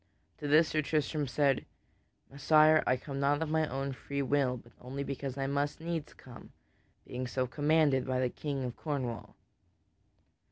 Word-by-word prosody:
To 145 - -4
this 155 +3 +5
Sir 155 - +1
Tristram 150 -1 -1
said: 135 +1 +2 0.7
"Messire, 155 +2 +5
I 130 - +3
come 135 +1 -6
not 145 +3 +2
of 160 - -4
my 160 0 +1
own 135 +1 -3
free 140 +2 -3
will, 135 -2 +1
but 120 0 -16
only 135 +3 -5
because 140 -1 -5
I 135 - -1
must 140 +1 -1
needs 165 -2 -4
come, 125 -2 -13 0.5
being 125 +1 -4
so 130 +1 -1
commanded 145 0 +2
by 130 -1 0
the 130 -1 +1
King 140 -3 -3
of 125 -2 -4
Cornwall." 130 -7 -4
140 Hz, 165 wpm, -31 LUFS, 130-150 Hz, 0.7 s, this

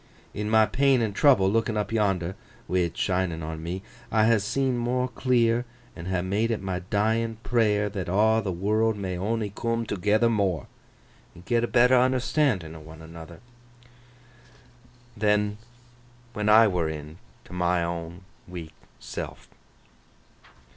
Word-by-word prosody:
In 105 0 -3
my 110 0 +5
pain 135 +2 +2
an' 105 -3 -2
trouble, 115 -5 +4
lookin 110 +2 0
up 105 - -2
yonder,—wi' 95 -3 -2
it 85 -2 -1
shinin 90 -3 -1
on 80 0 -5
me—I 110 +6 -2
ha' 115 -1 +4
seen 130 +6 0
more 125 +1 0
clear, 120 -1 +1 0.3
and 85 - -8
ha' 90 -1 -1
made 100 +5 0
it 115 - -1
my 95 -1 -3
dyin 110 +4 -1
prayer 105 -4 +2
that 95 -4 -5
aw 110 +4 +3
th' - - -12
world 105 +5 0
may 95 -2 -3
on'y 105 +3 -2
coom 115 +1 -2
toogether 105 +3 +1
more, 100 - 0 0.7
an' 85 - -14
get 120 -1 +1
a - - +1
better 125 +1 +4
unnerstan'in 125 - +1
o' - - -9
one 80 +1 -12
another, 80 +2 -11 1.7
than 105 -1 +1 0.7
when 105 0 -1
I 110 +1 +7
were 90 -5 0
in 75 +2 -8 0.3
't - - -12
my 90 -1 +1
own 85 +1 -5 0.2
weak 85 -3 -8 0.3
seln. - - -6
105 Hz, 145 wpm, -26 LUFS, 90-115 Hz, 1.7 s, I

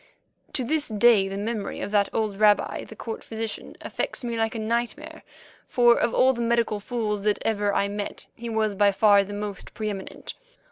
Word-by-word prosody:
To 265 - -1
this 300 +4 0
day 215 -2 +4
the 195 0 -5
memory 210 0 -3
of - - -4
that 205 -1 +3
old 210 -3 -1
rabbi, 210 -1 +3
the 220 - -12
court 225 +1 -6
physician, 225 -1 -6
affects - - -3
me 235 -1 -2
like 225 0 -1
a - - -2
nightmare, 240 +8 -3 0.5
for 240 -1 +5
of 235 - +1
all 260 +2 +4
the 235 - -4
medical 235 -2 +1
fools 210 -2 -2
that 210 0 +1
ever 205 -2 +1
I 200 - +1
met 205 0 -5
he 235 0 -6
was 220 -2 0
by 200 0 +3
far 205 0 +5
the 200 - -9
most 205 -1 -6
pre 215 -1 -2
eminent. 195 -2 -7
220 Hz, 195 wpm, -25 LUFS, 205-235 Hz, 0.5 s, for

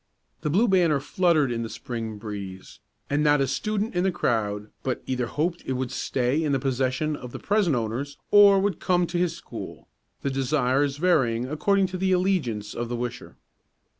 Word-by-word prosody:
The 150 - -1
Blue 200 +10 +3
Banner 175 -7 +3
fluttered 155 -2 +2
in 115 -1 -2
the 115 - -4
Spring 115 -3 -5
breeze, 100 -3 -8 0.3
and 145 +1 +1
not 145 -1 +4
a 135 - +3
student 210 - -2
in 175 0 +1
the 190 - +2
crowd 105 -10 -1
but 130 -2 -3
either 125 -2 -1
hoped 170 +6 -1
it 130 - -2
would 130 -1 -3
stay 130 +4 0
in 150 -2 0
the 135 - +2
possession 135 +3 0
of 125 -3 -9
the - - -4
present 200 -8 +1
owners, 125 +5 -3
or 200 -1 +8
would 195 -3 0
come 180 -1 +2
to 175 +1 -2
his 175 -2 0
school, - - -9 0.4
the 140 - 0
desires 135 +1 +1
varying 130 -9 +2
according 195 +7 +2
to 185 0 -4
the 190 0 +2
allegiance 150 - 0
of 120 0 -4
the 120 - -2
wisher. 120 +1 -6
140 Hz, 190 wpm, -25 LUFS, 120-180 Hz, 0.4 s, or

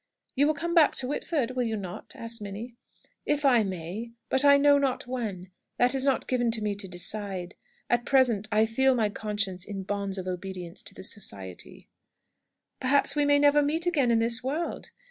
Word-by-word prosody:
'" - - -45
"You 285 +2 +3
will 310 - +1
come 340 +3 -3
back 325 -4 +5
to 255 - -1
Whitford, 285 -2 -1
will 255 0 -2
you 225 -2 -1
not?" 185 -3 -8
asked 230 -1 -6
Minnie. 210 +4 -7 0.5
"If 295 0 +1
I 245 -4 +5
may. 190 +3 -5 0.2
But 265 - +2
I 280 0 +7
know 285 0 +5
not 270 -2 -1
when. 210 -8 -5 0.3
That 245 +1 +3
is 265 -1 +1
not 270 -1 +1
given 245 -2 +1
me 210 -1 -1
to 200 -1 -6
decide. 185 0 -2 0.3
At 240 0 +1
present, 240 -7 +2
I 215 +1 +4
feel 265 +4 +2
my 220 -3 +1
conscience 205 -3 -3
in 195 -1 -6
bonds 200 0 -3
of 185 -1 -5
obedience 180 -1 -5
to - - -6
the - - -9
Society." 95 - -3 0.9
"Perhaps 280 +2 +2
we 295 -1 +2
may 285 0 +5
never 290 0 +5
meet 315 +4 0
again 295 -8 +2
in 230 - +4
this 230 +2 +1
world!" 300 +6 -3
230 Hz, 195 wpm, -27 LUFS, 200-275 Hz, 0.9 s, I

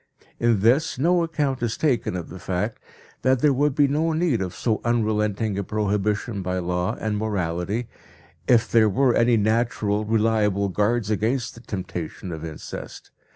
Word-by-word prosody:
In 115 -4 +2
this 125 +9 +3
no 170 +6 +3
account 150 -6 -1
is 115 -2 -1
taken 130 -11 0
of 90 -3 -5
the 95 - -9
fact 95 +4 -2 0.4
that 130 -1 +2
there 145 -2 +4
would 145 +1 +1
be 145 -1 +4
no 155 +4 +1
need 160 - +1
of 90 -2 -4
so 110 -3 -1
unrelenting 105 -3 0
a - - -1
prohibition 105 +1 -1
by 90 0 -2
law 90 0 -1
and 105 -1 -1
morality 100 +2 -2 0.6
if 120 -2 +4
there 110 -2 +4
were 130 +4 +3
any 115 0 +4
natural 110 -1 +1
reliable 105 -2 +1
guards 105 +3 0
against 115 +5 0
the 115 - -13
temptation 90 -4 -6
of 80 -1 -6
incest. 80 -2 -8
110 Hz, 160 wpm, -24 LUFS, 100-125 Hz, 0.6 s, there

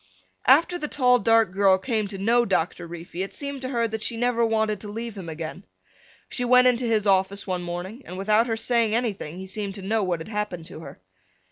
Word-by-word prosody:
After 335 +7 +5
the 300 - -2
tall 250 -4 +3
dark 225 -2 +3
girl 190 0 +4
came 215 +1 -1
to 195 0 -7
know 230 +5 +3
Doctor 175 -4 -1
Reefy 170 +1 -7
it 195 - -5
seemed 280 -2 -5
to 255 - -4
her 235 -3 0
that 220 0 -5
she 230 +1 -2
never 240 0 +1
wanted 220 -2 +1
to 210 - -6
leave 225 +1 -6
him 185 -4 -7
again. 160 +3 -6 0.6
She 250 - -2
went 250 +1 +6
into 250 0 +2
his 220 -2 +1
office 195 0 +2
one 185 -2 -2
morning 175 +7 -6
and 180 - -8
without 215 +4 +2
her 225 -1 -1
saying 225 -1 +2
anything 205 -9 -2
he 190 - -7
seemed 195 0 -5
to 200 - -9
know 220 +3 0
what 180 -4 -1
had 160 - -8
happened 210 -6 -4
to 165 - -10
her. 160 - -11
215 Hz, 225 wpm, -25 LUFS, 190-235 Hz, 0.6 s, went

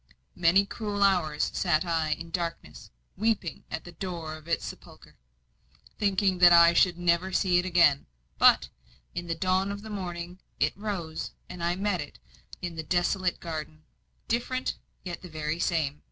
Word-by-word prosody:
Many 175 +4 +4
cruel 205 -1 -2
hours 175 -6 +2
sat 170 -2 +1
I 165 -2 0
in 165 +1 -8
darkness, 170 -1 -5 0.3
weeping 210 -6 -1
at 160 - -4
the 175 - -10
door 170 -3 -5
of 155 0 -11
its 170 - 0
sepulchre, - - -11 0.8
thinking 195 -3 +2
that 175 -1 +8
I 170 0 +8
should 175 0 +4
never 175 +1 +1
see 180 -2 +3
it 180 - -2
again; 170 -6 +4 0.3
but, - - +6 0.4
in 175 0 -5
the 165 - -1
dawn 185 +3 +1
of 200 +1 -6
the 220 - -8
morning, 175 -2 -5 0.2
it - - +1
rose, 190 -6 -4 0.2
and 180 -1 -7
I 170 +1 +1
met 195 -2 -1
it 145 - -9 0.5
in 175 -2 -4
the - - -2
desolate 180 +2 0
garden, 155 -2 -6 0.4
different, 250 +2 -1 0.3
yet 175 -2 -6
the 180 - -10
very 155 +1 -3
same. 155 -5 0
175 Hz, 165 wpm, -28 LUFS, 165-190 Hz, 0.8 s, that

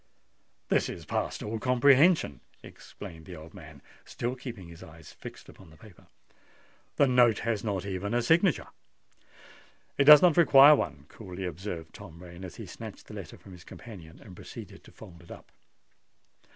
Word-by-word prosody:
"This - - +1
is - - -8
past - - -3
all 110 +1 -4
comprehension," 130 - +3 0.2
exclaimed 85 -6 -12
the 90 - -9
old 80 0 -13
man, 80 -6 -14 0.2
still 120 +2 -5
keeping 120 -8 -9
his 85 -1 -13
eyes 80 -3 -13
fixed - - -12
upon 95 - -16
the 80 - -18
paper. 100 +2 -18 0.9
"The - - +4
note 125 -4 +4
has 110 -3 -1
not 100 -4 -3
even 100 +3 -4
a 120 - +1
signature." 165 - +2 1.3
"It 140 - +4
does 150 +2 +9
not 175 -3 +4
require 145 -3 +8
one," 75 - -4
coolly 95 -2 -9
observed 85 -1 -7
Tom 90 -5 -13
Rain, 90 +1 -12
as 90 - -9
he - - -9
snatched - - -11
the - - -10
letter - - -9
from 95 - -16
his 90 -2 -13
companion, 90 -9 -13
and 95 -4 -14
proceeded 100 0 -11
to - - -16
fold 90 -6 -14
it 85 - -19
up. - - -13
100 Hz, 170 wpm, -28 LUFS, 85-125 Hz, 1.3 s, does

